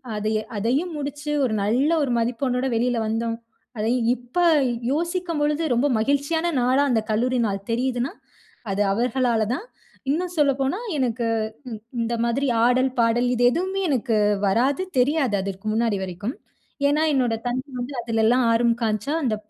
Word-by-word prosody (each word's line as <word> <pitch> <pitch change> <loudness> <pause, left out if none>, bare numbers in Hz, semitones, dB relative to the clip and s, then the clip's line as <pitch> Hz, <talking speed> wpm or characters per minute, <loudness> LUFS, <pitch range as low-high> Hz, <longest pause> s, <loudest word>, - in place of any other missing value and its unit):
அதை 215 +1 -1 0.3
அதையும் 270 - 0
முடிச்சு, 290 +1 -4
ஒரு 235 - -1
நல்ல 245 +8 +2
ஒரு 265 - -1
மதிப்பெண்ணோடு 250 +2 -1
வெளியில 245 +1 +1
வந்தோம். 230 +1 -1 0.4
அதையும் 230 +2 0
இப்ப, 245 +6 -11 0.6
யோசிக்கும் 340 0 -2
பொழுது 300 +2 +1
ரொம்ப 255 +5 +2
மகிழ்ச்சியான 285 +7 0
நாளா, 255 +3 +3
அந்த 225 -2 +2
கல்லூரி 245 +4 +1
நாள் 195 -1 -4
தெரியுதுன்னா, 250 +3 -1 0.6
அது 195 +1 0
அவர்களால 240 0 +1
தான். 415 - -7 0.5
இன்னும் 355 +3 -2
சொல்லப்போனா, 275 +5 +1 0.2
எனக்கு 240 -3 0 0.4
இந் 220 -3 -6 0.2
இந்த 230 +1 -1
மாதிரி, 245 +4 0 0.2
ஆடல், 255 +2 +3
பாடல் 235 +2 +3
இது 245 - +1
எதுவுமே 380 +6 -1
எனக்கு 240 -5 +1 0.3
வராது. 260 - +2 0.2
தெரியாது, 265 -4 +2
அதற்க்கு 195 +2 -6
முன்னாடி 225 -2 +1
வரைக்கும். 190 - -5 0.5
ஏன்னா, 295 +2 +2
என்னோட 245 -4 +1
தந்தை 255 +4 -2
வந்து 255 +3 -5
அதலெல்லாம் 230 +2 +2
ஆர்வம் 235 +1 +2
காமிச்சா, 215 +5 -1
அந்த 225 -4 +1
245 Hz, 145 wpm, -23 LUFS, 230-280 Hz, 0.6 s, நாளா